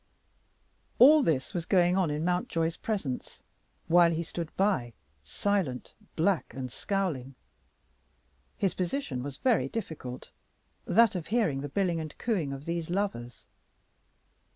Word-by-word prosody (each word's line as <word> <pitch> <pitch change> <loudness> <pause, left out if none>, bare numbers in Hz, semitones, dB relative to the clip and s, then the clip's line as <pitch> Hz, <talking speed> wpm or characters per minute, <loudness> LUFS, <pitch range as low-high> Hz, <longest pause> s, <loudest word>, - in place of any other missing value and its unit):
All 295 +5 +8
this 150 - 0
was 170 -2 -3
going 180 -2 +4
on 185 -4 +2
in 150 +2 -2
Mountjoy's 170 -2 0
presence, 190 - -4 0.4
while 170 +1 +6
he 165 0 -1
stood 165 0 -5
by, 185 - +1 0.3
silent, 145 - -2 0.2
black, 165 - 0
and 130 -2 -5
scowling. 155 -11 -2 1.2
His 195 - +1
position 180 - -2
was 135 0 -6
very 250 -4 +2
difficult, 155 - -6 0.5
that 230 0 +4
of 175 -4 -4
hearing 210 - +1
the 145 - -5
billing 175 0 0
and 155 -2 -7
cooing 185 - -1
of 140 +1 -7
these 170 -1 -3
lovers. 175 -11 -3
170 Hz, 130 wpm, -29 LUFS, 140-195 Hz, 1.2 s, All